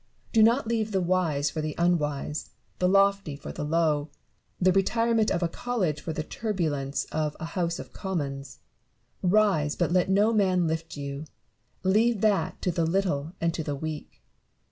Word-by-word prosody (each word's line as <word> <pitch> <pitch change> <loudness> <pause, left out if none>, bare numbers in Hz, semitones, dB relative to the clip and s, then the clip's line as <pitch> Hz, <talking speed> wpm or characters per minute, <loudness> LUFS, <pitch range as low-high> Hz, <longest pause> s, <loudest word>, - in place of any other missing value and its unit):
Do 225 - +5
not 235 +5 +4
leave 220 -2 0
the 190 - +2
wise 170 -6 +1
for 155 - -3
the 155 -1 -3
unwise, 150 -4 0 0.3
the 180 - +3
lofty 195 -5 +3
for 145 - -8
the - - -5
low, 155 -1 +1 0.5
the 185 0 +4
retirement 225 +3 +2
of 175 - 0
a - - +3
college 180 -6 -2
for 165 - -4
the 155 - -3
turbulence 155 -9 -2
of 155 -1 -1
a - - -4
House 170 -1 -2
of - - -9
Commons. 140 - -4 0.6
Rise, 185 -6 +3
but 175 -1 0
let 180 +1 +2
no 205 +4 +4
man 185 -4 +3
lift 160 -1 -3
you: 140 +1 -5 0.6
leave 215 +3 +3
that 210 -3 +1
to 180 - +1
the 170 -1 0
little 165 -4 0
and 165 0 0
to 165 - -3
the 145 -1 -3
weak. 150 - -7
170 Hz, 170 wpm, -27 LUFS, 150-195 Hz, 0.6 s, Do